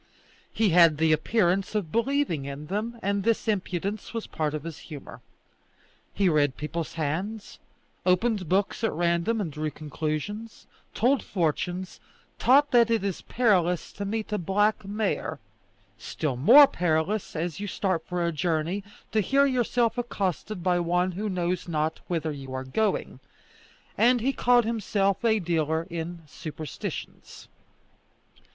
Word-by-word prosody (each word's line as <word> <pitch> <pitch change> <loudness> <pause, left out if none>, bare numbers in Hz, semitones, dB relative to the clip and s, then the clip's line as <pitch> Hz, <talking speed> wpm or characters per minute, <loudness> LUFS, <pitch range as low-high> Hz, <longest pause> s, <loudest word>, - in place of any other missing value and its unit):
He 220 -2 +2
had 165 -3 +6
the 160 +1 +3
appearance 190 +4 +1
of 190 -7 -1
believing 235 - 0
in 140 +2 -6
them, 215 +7 -3
and 200 +1 0
this 230 +2 0
impudence 200 +1 -2
was 225 - -3
a - - -16
part 155 -1 -2
of 150 - -5
his 165 -2 -7
humour. 150 -4 -10 0.9
He 195 -1 +1
read 145 -5 +2
people's 160 +2 -4
hands, 180 +8 -3 0.4
opened 185 -1 +1
books 195 +3 0
at 225 - +2
random 170 +6 +1
and 180 -7 -2
drew 155 +1 -2
conclusions, 155 - -5 0.3
told 260 +4 +3
fortunes, 180 +1 -2 0.4
taught 285 +3 +5
that 235 -2 +5
it 225 -3 +1
is 195 -3 -2
perilous 180 -8 +1
to 200 - -5
meet 215 +2 -3
a 210 - 0
black 205 +5 +1
mare, 210 +2 -2 0.6
still 150 -5 -3
more 240 - +9
perilous, 175 - -1
as 165 +2 -3
you 205 - -4
start 185 -4 -1
for 175 -1 -1
a 170 - +1
journey, 165 +4 -1 0.3
to 215 - +2
hear 275 +8 +3
yourself 245 -2 +1
accosted 200 -4 -3
by 180 -1 +2
one 180 +2 +1
who 205 +4 -3
knows 180 -1 -2
not 160 -1 -1
whither 160 -3 -1
you 135 -2 -8
are 130 - -3
going; 210 +12 -1 0.8
and 245 +1 +5
he 265 +4 0
called 245 -2 +4
himself 205 -3 0
a 220 -2 +4
dealer 160 -3 0
in 170 0 -5
superstitions. 155 +1 -7
185 Hz, 145 wpm, -26 LUFS, 160-220 Hz, 0.9 s, more